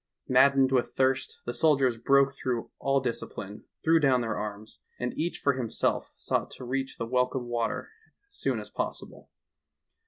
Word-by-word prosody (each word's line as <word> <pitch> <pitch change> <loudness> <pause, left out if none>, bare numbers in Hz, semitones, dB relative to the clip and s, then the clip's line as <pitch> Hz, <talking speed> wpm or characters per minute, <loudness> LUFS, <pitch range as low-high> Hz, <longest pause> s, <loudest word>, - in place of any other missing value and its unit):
Maddened 135 +1 +5
with 125 -2 +1
thirst, 130 0 +1
the 120 - -3
soldiers 135 -2 +3
broke 135 +4 +4
through 125 -4 -3
all 135 0 +2
dis 120 -3 -2
cipline, 100 +1 -8 0.2
threw 165 0 +5
down 135 -4 +3
their 115 -1 -2
arms, 105 +1 -6 0.2
and 125 - -2
each 170 +3 -2
for 140 - +2
him 125 -3 -3
self - - 0
sought - - -1
to - - -10
reach 135 +2 -3
the 115 - -3
welcome 125 +1 0
water 120 -1 -2 0.4
as 405 - -21
soon - - -1
as - - -9
possible. - - -5
130 Hz, 175 wpm, -28 LUFS, 120-135 Hz, 0.4 s, Maddened